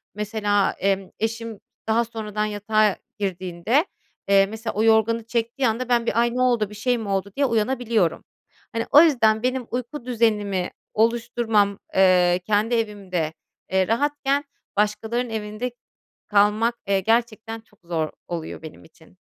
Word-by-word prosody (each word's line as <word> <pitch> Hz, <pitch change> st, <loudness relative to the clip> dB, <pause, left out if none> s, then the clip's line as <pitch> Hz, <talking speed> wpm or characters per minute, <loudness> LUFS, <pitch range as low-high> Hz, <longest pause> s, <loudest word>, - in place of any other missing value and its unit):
Mesela, 210 Hz, -1 st, +1 dB
emm, 195 Hz, -1 st, 0 dB
eşim 225 Hz, -1 st, -3 dB, 0.3 s
daha 230 Hz, +1 st, +2 dB
sonradan 215 Hz, -2 st, -3 dB
yatağa 210 Hz, 0 st, +1 dB, 0.2 s
girdiğinde, 185 Hz, -, 0 dB, 0.4 s
eee, 195 Hz, 0 st, +6 dB
mesela 220 Hz, +2 st, -5 dB
o 215 Hz, -, 0 dB
yorganı 225 Hz, 0 st, +3 dB
çektiği 235 Hz, +3 st, -1 dB
anda 240 Hz, +3 st, -2 dB
ben 235 Hz, -1 st, +2 dB
bir, 230 Hz, -, +1 dB
"Ay, 240 Hz, 0 st, 0 dB
ne 255 Hz, -, 0 dB
oldu, 230 Hz, -5 st, +1 dB
şey 245 Hz, +4 st, 0 dB
mi 220 Hz, -3 st, -5 dB
oldu?" 195 Hz, +1 st, -1 dB
diye 280 Hz, -, +3 dB
uyanabiliyorum. 230 Hz, -5 st, 0 dB, 0.5 s
Hani, 230 Hz, 0 st, -1 dB
o 295 Hz, -, +9 dB
yüzden 225 Hz, -8 st, +3 dB
benim 255 Hz, -1 st, -1 dB
uyku 250 Hz, +2 st, -4 dB
düzenimi 210 Hz, -6 st, 0 dB, 0.2 s
oluşturmam, 225 Hz, -2 st, +1 dB, 0.2 s
eee, 180 Hz, -2 st, +5 dB
kendi 215 Hz, +3 st, +2 dB
evimde, 195 Hz, -8 st, -2 dB, 0.4 s
eee, 190 Hz, -1 st, +2 dB
rahatken 285 Hz, +3 st, +1 dB, 0.3 s
başkalarının 220 Hz, +3 st, 0 dB
evinde 220 Hz, +3 st, -4 dB, 0.6 s
kalmak, 210 Hz, +3 st, +3 dB
eee, 195 Hz, -1 st, +2 dB
gerçekten 225 Hz, +1 st, 0 dB
çok 210 Hz, -2 st, -29 dB
zor 165 Hz, -2 st, -2 dB, 0.2 s
oluyor 165 Hz, -1 st, -5 dB
benim 160 Hz, -1 st, -11 dB
için. 160 Hz, +2 st, -21 dB
220 Hz, 140 wpm, -23 LUFS, 200-235 Hz, 0.6 s, o